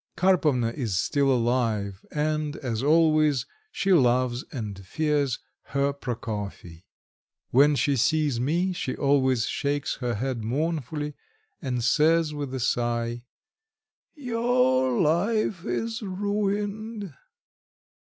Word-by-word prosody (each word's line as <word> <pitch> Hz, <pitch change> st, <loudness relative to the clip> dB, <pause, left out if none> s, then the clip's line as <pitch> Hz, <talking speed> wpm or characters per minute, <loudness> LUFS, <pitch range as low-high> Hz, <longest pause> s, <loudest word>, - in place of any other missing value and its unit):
Karpovna 155 Hz, -10 st, +2 dB
is 115 Hz, -7 st, -2 dB
still 140 Hz, +3 st, +2 dB
alive 115 Hz, -5 st, 0 dB
and, 150 Hz, 0 st, -1 dB
as 120 Hz, -5 st, -3 dB
always, 155 Hz, -3 st, +3 dB, 0.3 s
she 195 Hz, -1 st, +1 dB
loves 125 Hz, -4 st, +3 dB
and 105 Hz, -, -6 dB
fears 145 Hz, +4 st, 0 dB, 0.4 s
her 140 Hz, 0 st, +2 dB
Prokofy. 105 Hz, -9 st, -6 dB, 0.6 s
When 145 Hz, +3 st, +5 dB
she 140 Hz, 0 st, +1 dB
sees 140 Hz, 0 st, +1 dB
me, 170 Hz, +9 st, 0 dB
she 155 Hz, -7 st, -3 dB
always 130 Hz, -4 st, +2 dB
shakes 145 Hz, 0 st, -2 dB
her 120 Hz, -3 st, -2 dB
head 125 Hz, 0 st, -3 dB
mournfully, 150 Hz, +3 st, -2 dB, 0.5 s
and 125 Hz, -5 st, -2 dB
says 155 Hz, +4 st, +3 dB
with 145 Hz, -3 st, -4 dB
a -, -, -3 dB
sigh: 120 Hz, -1 st, -1 dB, 0.9 s
"Your 230 Hz, -, +1 dB
life 190 Hz, +3 st, +1 dB
is 225 Hz, 0 st, -2 dB
ruined." 205 Hz, 0 st, -2 dB
140 Hz, 105 wpm, -26 LUFS, 120-165 Hz, 0.9 s, When